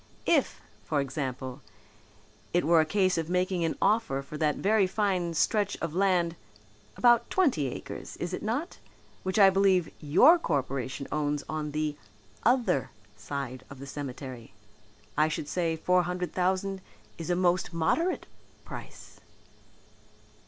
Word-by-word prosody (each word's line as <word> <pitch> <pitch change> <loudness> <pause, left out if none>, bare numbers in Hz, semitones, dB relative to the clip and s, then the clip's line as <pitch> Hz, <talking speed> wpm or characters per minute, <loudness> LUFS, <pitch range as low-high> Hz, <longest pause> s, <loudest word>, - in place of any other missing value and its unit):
If, - - +2 0.2
for 150 - 0
example, 130 -1 -4 0.9
it 175 -2 +2
were 165 0 +5
a 155 - -1
case 185 -1 +2
of 165 0 -4
making 180 0 0
an 165 - -1
offer 210 -11 +1
for 140 - -9
that 150 -2 +2
very 205 -1 +3
fine 185 -4 0
stretch 205 +4 +1
of 165 -2 -3
land, 180 -3 +2 0.6
about 240 -1 +4
twenty 270 - +2
acres, 125 - -7
is 175 +1 -4
it - - -3
not, 245 +10 -3 0.4
which 190 +1 -2
I 195 -2 +8
believe 190 -3 +3
your 180 - +6
Corporation 135 - -2
owns 145 -1 -1
on 155 -1 -3
the 150 0 -2 0.4
other 235 - +2 0.3
side 130 +4 -5
of 140 - -10
the 135 - -9
cemetery, 130 -6 -7 0.6
I 155 - +4
should 155 -1 -3
say 165 0 0
four 180 +3 +2
hundred 180 0 -3
thousand 190 +1 0 0.4
is 165 - -5
a 175 - +2
most 180 +1 +1
modest 320 - 0 0.4
price." - - -10
170 Hz, 140 wpm, -28 LUFS, 145-190 Hz, 0.9 s, I